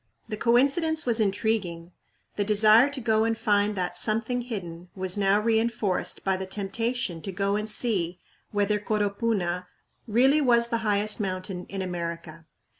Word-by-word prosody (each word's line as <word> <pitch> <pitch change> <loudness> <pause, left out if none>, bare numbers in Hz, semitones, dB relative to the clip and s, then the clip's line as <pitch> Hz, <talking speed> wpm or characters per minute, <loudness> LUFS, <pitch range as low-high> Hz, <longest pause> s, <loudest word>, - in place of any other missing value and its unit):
The 215 - -3
coincidence 280 +8 +2
was 235 -2 +1
intriguing. 195 -5 -1 0.4
The 205 - 0
desire 215 +5 +5
to 280 -1 -3
go 220 -2 +1
and 225 0 0
find 205 0 +1
that 180 -2 -3
"something 225 +3 0
hidden" 180 -7 -7
was 185 -1 +1
now 200 0 +2
reënforced 220 -3 0
by 190 -1 0
the 190 0 -5
temptation 200 -1 -2
to 195 - -5
go 195 +2 -1
and 210 +1 -2
see 185 -7 0 0.3
whether 205 0 0
Coropuna 205 -4 -1 0.4
really 265 +7 +3
was 235 -3 +4
the 230 - -1
highest 210 0 +1
mountain 185 -2 -4
in 195 -1 -4
America. 170 -2 -6
210 Hz, 150 wpm, -26 LUFS, 185-230 Hz, 0.4 s, desire